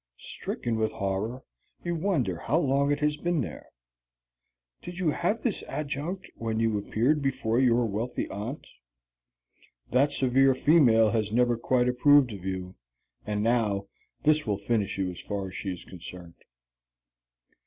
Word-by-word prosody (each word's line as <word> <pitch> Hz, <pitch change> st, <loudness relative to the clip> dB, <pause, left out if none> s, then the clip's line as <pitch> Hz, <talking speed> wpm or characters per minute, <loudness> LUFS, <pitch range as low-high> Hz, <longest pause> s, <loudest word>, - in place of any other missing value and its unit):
Stricken 115 Hz, -2 st, -3 dB
with 110 Hz, 0 st, 0 dB
horror, 100 Hz, +6 st, -3 dB, 0.4 s
you 175 Hz, -, -1 dB
wonder 155 Hz, -, 0 dB
how 140 Hz, -, 0 dB
long 140 Hz, -2 st, +2 dB
it 145 Hz, +1 st, 0 dB
has 150 Hz, 0 st, +1 dB
been 175 Hz, -1 st, 0 dB
there. -, -, -7 dB, 1.1 s
Did 175 Hz, 0 st, -8 dB
you 175 Hz, -5 st, +1 dB
have 205 Hz, +9 st, -1 dB
this 230 Hz, -6 st, -1 dB
adjunct 150 Hz, +5 st, -4 dB
when 110 Hz, -1 st, -3 dB
you 115 Hz, -1 st, +1 dB
appeared 120 Hz, +8 st, +1 dB
before 125 Hz, -4 st, 0 dB
your 120 Hz, -2 st, +4 dB
wealthy 110 Hz, +3 st, -2 dB
aunt? 110 Hz, +9 st, -5 dB, 1.3 s
That 140 Hz, +4 st, +3 dB
severe 135 Hz, -1 st, +3 dB
female 120 Hz, -8 st, +5 dB
has 110 Hz, -2 st, 0 dB
never 120 Hz, +1 st, +3 dB
quite 125 Hz, +1 st, +1 dB
approved 125 Hz, 0 st, +5 dB
of 95 Hz, -3 st, -9 dB
you, 95 Hz, -1 st, -4 dB, 0.5 s
and 105 Hz, 0 st, -1 dB
now 105 Hz, -4 st, +1 dB, 0.3 s
this 155 Hz, -2 st, +3 dB
will 105 Hz, -2 st, +1 dB
finish 100 Hz, -1 st, -1 dB
you 95 Hz, -2 st, -1 dB
as 90 Hz, -, -9 dB
far 100 Hz, -2 st, -4 dB
as -, -, -12 dB
she 95 Hz, -, -3 dB
is 90 Hz, -, -8 dB
concerned. 90 Hz, -1 st, -10 dB
120 Hz, 150 wpm, -28 LUFS, 105-145 Hz, 1.3 s, female